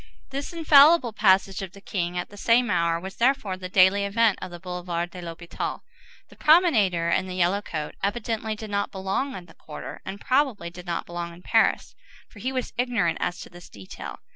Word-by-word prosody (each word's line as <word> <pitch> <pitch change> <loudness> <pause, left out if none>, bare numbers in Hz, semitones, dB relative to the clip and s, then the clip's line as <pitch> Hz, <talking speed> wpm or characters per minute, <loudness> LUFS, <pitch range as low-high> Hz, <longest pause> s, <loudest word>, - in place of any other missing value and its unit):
This 275 +1 -4
infallible 305 -5 +6
passage 190 -1 +3
of 190 -1 -7
the 200 - -13
king 180 -3 -3
at 175 - -3
the 205 - -13
same 230 +2 +2
hour 170 -1 +1
was, 190 +2 -8
therefore, 240 -6 +1
the 185 0 -8
daily 190 +1 +5
event 210 +1 +2
of 185 - -5
the 175 0 -9
Boulevard 175 -1 -4
de 180 - -9
l'Hôpital. 170 0 -5 0.5
The - - -16
promenader 220 - +4
in 190 - +1
the 185 - -6
yellow 185 +3 +1
coat 155 -6 -5
evidently 220 +1 -2
did 215 0 -8
not 200 0 0
belong 195 +8 -2
in 180 - -8
the 165 - -17
quarter, 150 - -9
and 195 +1 -7
probably 255 -10 0
did 180 +1 -11
not 170 -1 -2
belong 170 0 -6
in 175 +1 -15
Paris, - - +2 0.3
for 205 - -16
he 255 +5 -2
was 255 -2 -3
ignorant 230 -9 +1
as 175 - -2
to - - -10
this 175 0 -13
detail. 95 -2 -9
195 Hz, 200 wpm, -25 LUFS, 175-230 Hz, 0.5 s, infallible